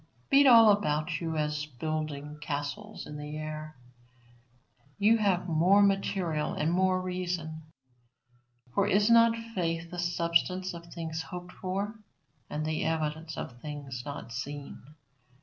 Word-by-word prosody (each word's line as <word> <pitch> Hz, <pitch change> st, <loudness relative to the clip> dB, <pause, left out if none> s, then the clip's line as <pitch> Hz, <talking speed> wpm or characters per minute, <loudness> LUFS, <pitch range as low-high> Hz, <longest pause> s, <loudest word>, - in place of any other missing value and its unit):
Beat 275 Hz, 0 st, +7 dB
all 230 Hz, -4 st, +9 dB
about 155 Hz, -8 st, 0 dB
you 160 Hz, -1 st, -2 dB
at 150 Hz, 0 st, 0 dB, 0.2 s
building 150 Hz, -1 st, -3 dB
castles 150 Hz, +8 st, -4 dB
in 150 Hz, -, -7 dB
the 150 Hz, +1 st, -6 dB
air; 155 Hz, 0 st, -6 dB, 1.2 s
you 220 Hz, +3 st, +4 dB
have 190 Hz, -4 st, +1 dB
more 180 Hz, +5 st, +5 dB
material 190 Hz, -6 st, 0 dB
and 155 Hz, +2 st, 0 dB
more 185 Hz, 0 st, +3 dB
reason. 180 Hz, -3 st, -3 dB, 1.1 s
For 200 Hz, 0 st, +2 dB
is 205 Hz, +2 st, +3 dB
not 230 Hz, 0 st, +6 dB
faith 170 Hz, -7 st, -3 dB
the 175 Hz, -, -5 dB
substance 175 Hz, +2 st, +1 dB
of 170 Hz, 0 st, -9 dB
things 165 Hz, -1 st, -4 dB
hoped 180 Hz, +2 st, -8 dB
for, 200 Hz, +5 st, -4 dB, 0.5 s
and 150 Hz, +1 st, -3 dB
the 155 Hz, 0 st, -1 dB
evidence 160 Hz, 0 st, -2 dB
of 120 Hz, -1 st, -7 dB
things 145 Hz, -4 st, -6 dB
not 140 Hz, -4 st, -7 dB
seen? 140 Hz, +4 st, -6 dB
170 Hz, 130 wpm, -29 LUFS, 155-190 Hz, 1.2 s, all